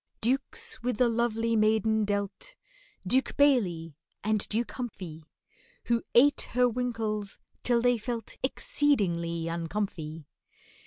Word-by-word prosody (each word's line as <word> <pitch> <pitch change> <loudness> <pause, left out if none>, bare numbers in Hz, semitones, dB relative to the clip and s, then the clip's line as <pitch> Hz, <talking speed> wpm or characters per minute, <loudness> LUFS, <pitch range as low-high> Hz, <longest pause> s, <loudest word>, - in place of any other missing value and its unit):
Dukes 260 +1 -1
with 245 -2 -1
the 250 - +4
lovely 230 -1 +1
maiden 220 0 +3
dealt, 205 - -3 0.5
DUKE 250 +6 +1
BAILEY 185 - +3 0.3
and 215 +1 +2
DUKE 230 +2 -1
HUMPHY, 185 -10 -7 0.6
Who 235 -1 +2
ate 280 +5 +5
her 250 +1 +4
winkles 225 -4 -2 0.2
till 240 -1 +2
they 245 -1 +3
felt 230 -1 -5
Exceedingly 170 - +1
uncomfy. 165 -2 -3
220 Hz, 110 wpm, -29 LUFS, 195-245 Hz, 0.6 s, ate